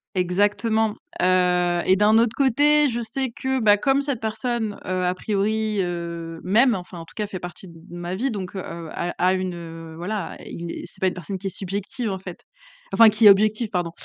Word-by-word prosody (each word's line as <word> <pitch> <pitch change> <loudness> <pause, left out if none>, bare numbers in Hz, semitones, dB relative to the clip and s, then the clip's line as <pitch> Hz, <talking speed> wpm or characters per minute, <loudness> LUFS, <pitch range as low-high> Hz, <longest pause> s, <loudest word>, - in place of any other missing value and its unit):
Exactement, 205 +4 +1 0.3
heu 180 -1 +3
et 190 - +5
d'un 210 +3 +4
autre 230 -1 +2
côté 290 +3 +4
je 240 0 -2
sais 260 +3 -2
que, 265 +3 -2
bah, 210 -3 +5
comme 270 +6 +2
cette 280 -4 -2
personne, 220 -1 -2
heu, 185 0 -1
a 180 - +1
priori, 215 +2 -1
heu, 170 -2 -4
m'aime, 235 +7 +4
enfin, 180 -1 -8
en 165 - -8
tout - - -18
cas 210 -1 -2
fait 190 -2 -6
partie 175 +2 -9
d 170 - -13
de 165 +1 -13
ma 175 +1 -4
vie 255 +7 -1
donc, 195 -3 -5
heu - - -3
heu, 170 -2 -7
a 175 - -3
a 180 +1 +3
une, 185 -1 -2
heu, 165 -1 -9
voilà, 185 +3 -4
il 170 0 -6
et - - -7
c'est - - -20
pas 190 - +3
une 185 - 0
personne 185 +2 -6
qui 195 +1 -5
est - - -1
subjective, 200 +5 -3
en 190 - -3
fait. 185 -2 -9 0.5
Enfin, 225 +3 +8
qui 215 +1 +2
est - - +12
objective 215 +3 +3
pardon. 175 -4 -2
195 Hz, 220 wpm, -23 LUFS, 180-220 Hz, 0.5 s, est